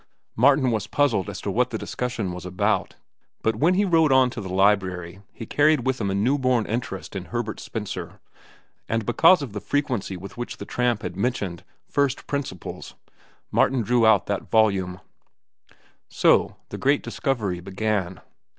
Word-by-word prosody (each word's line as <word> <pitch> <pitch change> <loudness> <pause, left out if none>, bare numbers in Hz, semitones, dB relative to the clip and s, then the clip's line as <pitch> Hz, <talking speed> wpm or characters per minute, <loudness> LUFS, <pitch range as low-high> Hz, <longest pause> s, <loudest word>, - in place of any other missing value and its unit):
Martin 135 +1 +4
was 110 -1 -1
puzzled 125 - +1
as - - -6
to - - -3
what - - +1
the - - -3
discussion 120 -6 -3
was 90 0 -7
about, 100 +4 -1 0.5
but 110 -1 +1
when 170 +9 +3
he 205 +2 +3
rode 165 -5 +3
on 130 -1 +5
to - - -6
the 95 -2 -6
library 95 -2 +1
he 115 - -8
carried 145 +1 +3
with 130 -2 0
him 100 - 0
a 95 - -1
new 125 +9 +2
born 125 -4 +2
interest 100 -6 -4
in 95 -2 -4
Herbert 120 -1 -4
Spencer, 95 -6 -6 0.7
and 115 -1 -1
because 160 - +5
of 120 -7 -7
the 105 - -5
frequency 125 -9 -2
with 95 +5 -10
which 120 - -5
the - - -7
tramp 120 -3 0
had 90 - -5
mentioned 100 -5 -2 0.2
"First 140 -2 0
Principles," 140 - -5 0.6
Martin 130 -3 +2
drew 120 +2 +2
out 110 -3 +5
that 100 -2 -3
volume. 95 -5 +2 1.1
So - - +3
the - - -6
great 140 +2 +2
discovery 105 -10 -2
began. 95 -1 -2
110 Hz, 170 wpm, -24 LUFS, 95-130 Hz, 1.1 s, on